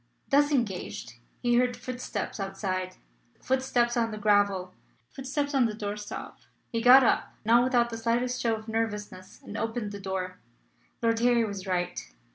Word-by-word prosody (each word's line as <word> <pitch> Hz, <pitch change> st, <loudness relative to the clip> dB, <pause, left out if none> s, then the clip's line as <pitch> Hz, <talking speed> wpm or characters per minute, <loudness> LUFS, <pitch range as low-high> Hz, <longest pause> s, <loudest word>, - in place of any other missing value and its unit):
Thus 290 Hz, +1 st, +4 dB
engaged, 120 Hz, -, -2 dB, 0.2 s
he 240 Hz, 0 st, +3 dB
heard 245 Hz, 0 st, +2 dB
footsteps 250 Hz, -3 st, -5 dB
outside, 190 Hz, -1 st, -3 dB, 0.4 s
footsteps 255 Hz, -2 st, +1 dB
on 230 Hz, -1 st, +1 dB
the 215 Hz, -, -6 dB
gravel, 200 Hz, -3 st, +2 dB, 0.4 s
footsteps 285 Hz, +2 st, -3 dB
on 265 Hz, -3 st, +4 dB
the 215 Hz, -, -5 dB
doorstop. 205 Hz, -1 st, -6 dB, 0.3 s
He 230 Hz, -, -1 dB
got 255 Hz, +3 st, +9 dB
up, -, -, +1 dB
not 235 Hz, +2 st, +5 dB
without 240 Hz, -2 st, +2 dB
the 225 Hz, -, -5 dB
slightest 240 Hz, +2 st, 0 dB
show 230 Hz, -2 st, +2 dB
of 220 Hz, 0 st, -10 dB
nervousness, 210 Hz, -4 st, -4 dB
and 205 Hz, -, -9 dB
opened 225 Hz, -1 st, -2 dB
the 200 Hz, -, -7 dB
door. 185 Hz, -1 st, -4 dB, 0.6 s
Lord 230 Hz, 0 st, +2 dB
Harry 240 Hz, -1 st, +3 dB
was 200 Hz, -2 st, -6 dB
right. 180 Hz, -1 st, -1 dB
225 Hz, 155 wpm, -28 LUFS, 195-245 Hz, 0.6 s, got